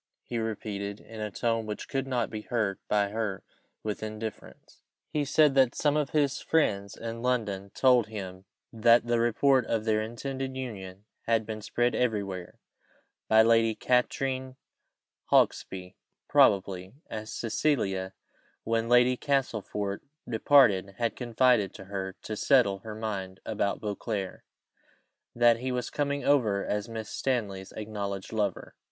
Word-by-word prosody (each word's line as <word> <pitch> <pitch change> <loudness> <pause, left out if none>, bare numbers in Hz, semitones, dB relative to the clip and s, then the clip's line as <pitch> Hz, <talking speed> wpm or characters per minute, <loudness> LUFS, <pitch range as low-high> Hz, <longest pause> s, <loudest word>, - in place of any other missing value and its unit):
he 120 - -3
repeated, 105 -2 -4
in 110 -1 -10
a 105 - -2
tone 115 +1 -1
which 105 - -5
could 135 0 -2
not 125 -3 -1
be 110 - -4
heard 105 -4 -1
by 105 -1 +2
her 105 -3 -3 0.4
with 105 -1 -3
indifference. 110 0 -7 0.3
He 150 - 0
said 150 +1 +4
that 130 -3 +4
some 145 -1 +2
of 150 -2 +1
his 145 -3 +1
friends 100 -11 +1
in 115 0 -5
London 105 -6 -1
told 125 -4 +4
him 95 -3 -7 0.3
that 115 +1 +5
the 120 0 +1
report 125 +3 +3
of 110 -1 -1
their 110 -1 +2
intended 130 +4 -4
union 100 -6 -7 0.2
had 115 -1 +2
been 110 0 -5
spread 120 +3 0
everywhere 100 -7 -2 0.7
(by 110 0 +6
Lady 115 -1 +4
Katrine 130 +2 0 0.7
Hawksby 90 -1 +1 0.3
probably, 95 0 +3
as 110 0 -6
Cecilia, 100 -6 -1 0.5
when 115 0 0
Lady 125 +1 +5
Castlefort 110 -7 -1 0.3
departed, 110 -5 +4
had 115 0 -1
confided 120 -3 +2
to 95 - -10
her, 95 -1 -4
to 110 - -4
settle 105 -5 +3
her 105 +2 -8
mind 100 -4 -4
about 100 -2 -1
Beauclerc, 105 -2 -4 0.9
that 120 -1 +5
he 130 +1 -2
was 125 0 -3
coming 140 -1 -1
over 110 -9 +2
as 105 +2 -2
Miss 110 -1 -6
Stanley's 100 -7 -2
acknowledged 100 -2 -5
lover). 105 -4 -2
110 Hz, 140 wpm, -28 LUFS, 100-125 Hz, 0.9 s, by